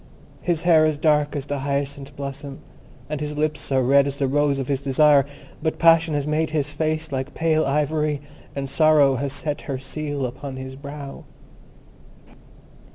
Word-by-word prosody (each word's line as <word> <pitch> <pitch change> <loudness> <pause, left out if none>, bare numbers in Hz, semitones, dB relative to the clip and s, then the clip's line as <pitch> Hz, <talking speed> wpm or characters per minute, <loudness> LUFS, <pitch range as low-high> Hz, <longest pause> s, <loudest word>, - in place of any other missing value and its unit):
His 170 -2 -1
hair 165 -3 +5
is 155 -1 -1
dark 150 -1 +2
as 140 -2 -3
the 145 -1 -3
hyacinth 140 0 -3
blossom, 140 0 -6 0.5
and 150 0 -4
his 150 0 -4
lips 155 -1 -1
are 130 -1 +3
red 140 +2 +4
as 140 0 -4
the 140 - +1
rose 145 +1 +2
of 135 -2 -3
his 140 -1 -1
desire; 140 +1 +4 0.3
but 160 0 -1
passion 165 -1 +4
has 145 -1 -1
made 155 +1 0
his 150 -2 -1
face 155 +1 -2
like 130 +1 -4
pale 160 -2 +2
ivory, 150 +1 0 0.4
and 140 -1 -3
sorrow 150 -3 +4
has 140 +2 -2
set 145 +2 -2
her 135 - -1
seal 145 0 -4
upon 130 +2 -6
his 130 0 -7
brow." 140 0 -9
145 Hz, 170 wpm, -23 LUFS, 140-155 Hz, 0.5 s, hair